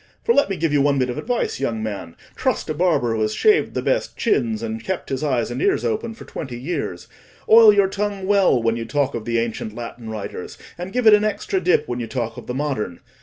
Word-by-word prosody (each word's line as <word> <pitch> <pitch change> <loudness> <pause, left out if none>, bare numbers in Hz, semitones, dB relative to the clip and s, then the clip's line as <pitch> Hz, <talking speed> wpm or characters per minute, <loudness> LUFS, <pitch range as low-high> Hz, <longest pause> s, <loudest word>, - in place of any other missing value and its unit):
For, 465 - +3
let 280 - +3
me 195 - -2
give 160 -2 0
you 145 - +4
one 140 0 +2
bit 130 -1 +1
of - - -5
advice, 245 -1 -2
young 115 -5 -2
man—trust 110 - -4
a - - 0
barber 155 -8 +1
who 110 - -1
has 110 0 0
shaved 425 -1 +3
the - - -1
best - - -1
chins, 230 - 0
and 225 0 -4
kept 190 -1 -4
his 135 +1 -2
eyes 125 -6 0
and 125 - -3
ears 120 - +1
open 225 - -2
for - - -12
twenty 130 -5 -6
years—oil 215 - +2
your 200 -2 +4
tongue 200 0 -3
well 195 -9 +4
when 115 0 +1
you 115 0 -4
talk 140 +3 0
of 115 -2 -5
the 115 -1 0
ancient 115 -2 -3
Latin 115 -1 -7
writers, 105 -4 -6 0.2
and 180 +2 -6
give 250 +1 -1
it 220 - +8
an 210 0 +5
extra 200 -2 -1
dip 170 -4 +2
when 120 0 -3
you 115 - -4
talk 120 -3 -3
of - - -10
the 125 - -3
modern. 130 - -2
145 Hz, 235 wpm, -21 LUFS, -, 0.2 s, it